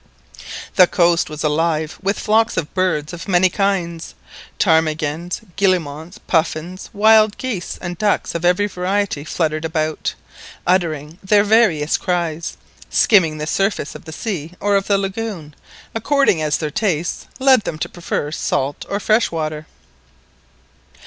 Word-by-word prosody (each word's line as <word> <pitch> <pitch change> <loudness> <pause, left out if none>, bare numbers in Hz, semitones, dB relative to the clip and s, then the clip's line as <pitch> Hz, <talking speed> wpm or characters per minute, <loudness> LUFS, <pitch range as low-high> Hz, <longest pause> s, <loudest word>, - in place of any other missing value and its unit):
The 180 -2 +8
coast 170 -2 +2
was 155 0 -6
alive 155 0 0
with 195 +2 0
flocks 220 +1 +2
of 155 -3 -2
birds 180 -5 0
of 175 +2 -8
many 185 -1 +3
kinds; 175 -5 -1 0.4
ptarmigans, 160 +1 +1 0.2
guillemots, 175 -4 0
puffins, 170 +2 -1
wild 215 0 +5
geese, 230 -9 -4
and 175 -1 -6
ducks 210 -1 +1
of 170 - -3
every 180 +3 +3
variety 190 -4 -1
fluttered 155 0 -1
about, 155 -1 -2 0.5
uttering 165 -3 0
their 205 +1 +4
various 205 -9 +3
cries, 170 -3 -2 0.3
skimming 165 -8 +4
the 150 - -3
surface 195 -2 -1
of - - -11
the 160 - -8
sea 170 -3 -4
or 205 0 +1
of 195 0 +1
the 200 - +3
lagoon, 195 -6 -4 0.4
according 225 - +2
as 150 -1 +1
their 155 -2 -3
tastes 170 -3 -1
led 265 -2 +5
them 165 - -5
to - - -3
prefer 160 -4 -3
salt 140 -2 -2
or 200 - -1
fresh 215 +2 +2
water. 155 -2 -4
175 Hz, 140 wpm, -19 LUFS, 155-200 Hz, 0.5 s, The